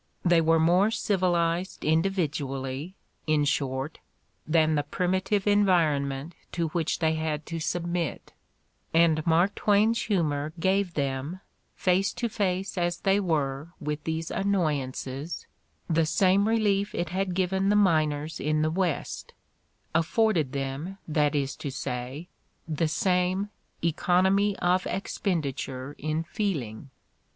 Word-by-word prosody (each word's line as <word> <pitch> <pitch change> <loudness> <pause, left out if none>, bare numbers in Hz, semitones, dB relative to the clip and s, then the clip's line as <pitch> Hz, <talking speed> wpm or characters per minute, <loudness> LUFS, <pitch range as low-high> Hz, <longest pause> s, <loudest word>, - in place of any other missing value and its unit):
They 175 -1 +5
were 165 0 +4
more 180 +6 +4
civilized 180 -4 0
individually, 150 -3 -1 0.3
in 155 -1 +3
short, 140 0 -1 0.5
than 155 0 +3
the 150 - +2
primitive 185 +5 0
environment 165 -8 +2 0.2
to 170 -2 -1
which 165 0 -1
they 160 -1 +1
had 155 -1 -2
to 165 -1 -4
submit: 170 0 -2 0.6
and 160 -2 +4
Mark 170 +5 +4
Twain's 215 +2 +3
humor 155 -6 0
gave 190 0 +1
them, 140 +5 -2 0.4
face 185 +1 +2
to 235 - -2
face 195 -3 -1
as 175 0 -1
they 195 +1 +3
were 155 -3 -1
with 150 0 -3
these 160 0 -3
annoyances, 150 -6 -2 0.4
the 165 -1 +2
same 195 +4 +3
re 225 +1 +3
lief 205 -2 +1
it 170 -1 -2
had 185 0 -1
given 190 +1 +1
the 205 - +4
miners 155 -5 +2
in 155 +1 +1
the 155 - +1
West, 175 -3 -2 0.6
afforded 165 - +2
them, 140 +7 -4
that 150 -1 +1
is 140 -1 -1
to 145 - -4
say, 130 +4 -5 0.4
the 160 0 0
same 185 +4 +1 0.3
"economy 190 +4 +2
of 180 +1 +1
expenditure 140 -9 -3
in 155 +2 -1
feeling." 150 - -3
165 Hz, 125 wpm, -27 LUFS, 150-190 Hz, 0.6 s, They